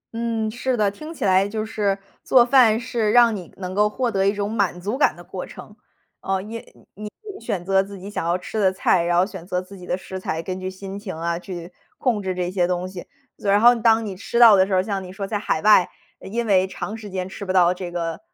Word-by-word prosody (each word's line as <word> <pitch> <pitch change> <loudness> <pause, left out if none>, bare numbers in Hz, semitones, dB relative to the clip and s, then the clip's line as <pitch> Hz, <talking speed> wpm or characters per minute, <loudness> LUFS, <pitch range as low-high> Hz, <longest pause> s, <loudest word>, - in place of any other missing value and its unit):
嗯， 230 -1 -1
是 250 +2 -1
的， 205 -2 +2
听 305 +10 -9
起 320 - -4
来 190 +1 +3
就 215 0 -3
是 205 -3 -1 0.3
做 250 -2 +5
饭 240 -4 +5
是 230 -3 -1
让 235 -2 +5
你 180 -5 -8
能 185 -1 -5
够 210 +2 +3
获 240 +2 -1
得 195 -1 +1
一 - - +4
种 205 0 -3
满 200 -5 0
足 205 +6 -3
感 275 - +2
的 - - -12
过 - - -6
程。 - - -12 0.5
呃， 190 0 -1
因 220 +4 -7 0.3
你 210 +1 -7 0.2
你 405 - -11
选 175 -3 -3
择 190 0 +3
自 200 +1 -8
己 195 +2 -9
想 - - -3
要 170 +2 +1
吃 215 +4 -5
的 190 -2 +4
菜， 185 -2 +2
然 175 0 +1
后 180 - +4
选 190 -3 -9
择 180 -1 -1
自 185 +2 -10
己 180 -2 -12
的 - - -1
食 190 0 -7
材， 165 -3 -3
根 185 0 -4
据 185 0 -4
心 195 +1 -8
情 195 -5 -6
啊 170 +1 -2
去 175 -1 -8 0.3
控 235 -6 0
制 190 -1 -3
这 180 0 -2
些 180 -2 +1
东 180 0 -2
西， 185 -2 -9 0.3
所 200 - -2
然 200 - +5
后 240 +3 +7
当 225 -1 +3
你 200 -3 -5
吃 225 +4 -4
到 230 -3 +9
的 190 -1 +4
时 195 - -3
候 185 - +4
儿 - - -5
像 200 -2 -3
你 180 - -9
说 195 +1 -5
在 205 +1 -2
海 160 -6 -1
外， 210 -4 +6 0.3
呃， - - -11
因 235 +3 -2
为 190 -3 +3
长 205 +2 -6
时 215 -2 -9
间 185 -1 -4
吃 195 - -8
不 190 - -2
到 180 -1 +4
这 180 -1 -7
个， 170 -1 -3
195 Hz, 285 characters per minute, -22 LUFS, 185-220 Hz, 0.5 s, 到